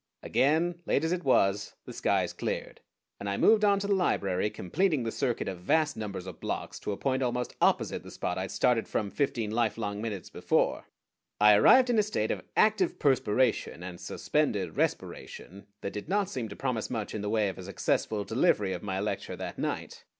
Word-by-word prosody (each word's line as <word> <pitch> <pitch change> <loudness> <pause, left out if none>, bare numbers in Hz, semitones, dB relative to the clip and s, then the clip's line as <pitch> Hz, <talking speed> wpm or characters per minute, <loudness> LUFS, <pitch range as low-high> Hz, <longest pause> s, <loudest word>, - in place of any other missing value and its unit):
Again, 165 +5 +1
late 140 - +2
as 160 - 0
it 180 0 -1
was, 100 -6 +2
the - - -8
skies - - 0
cleared, - - -4 0.4
and 100 - -4
I 100 - -1
moved 215 -1 +5
on 200 -1 +5
to - - -2
the 200 - +2
library, 100 - +1
completing 150 - 0
the 115 - -2
circuit 125 -1 -1
of 95 -2 -4
vast 155 - +1
numbers 100 -4 -5
of 95 -3 -9
blocks - - -4
to - - -4
a 100 - -3
point 130 -1 0
almost 125 -1 -2
opposite - - +2
the - - -11
spot 90 - -3
I 95 - -3
had - - -8
started 115 +2 +2
from 100 -2 -2
fifteen 120 -7 -1
lifelong 110 -2 -1
minutes 105 -4 -5
before. - - 0 0.5
I 105 0 +7
arrived 250 - +6
in 230 - +3
a - - +7
state 210 +1 -1
of - - -2 0.2
active 370 -3 +3
perspiration 130 - +1
and 90 -1 -7
suspended 105 - -1
respiration 100 +3 -4
that 100 - -4
did 105 +9 -6
not 200 0 +1
seem 120 -4 -4
to 100 - -8
promise 125 -5 -2
much 110 -4 -4
in 110 - -3
the 105 - -2
way 110 -1 +2
of 95 - -5
a - - -7
successful 100 +2 -1
delivery 100 -2 +2
of 90 - -5
my 95 -2 -3
lecture 105 +2 -3
that - - -6
night. - - -4
110 Hz, 200 wpm, -29 LUFS, 100-145 Hz, 0.5 s, I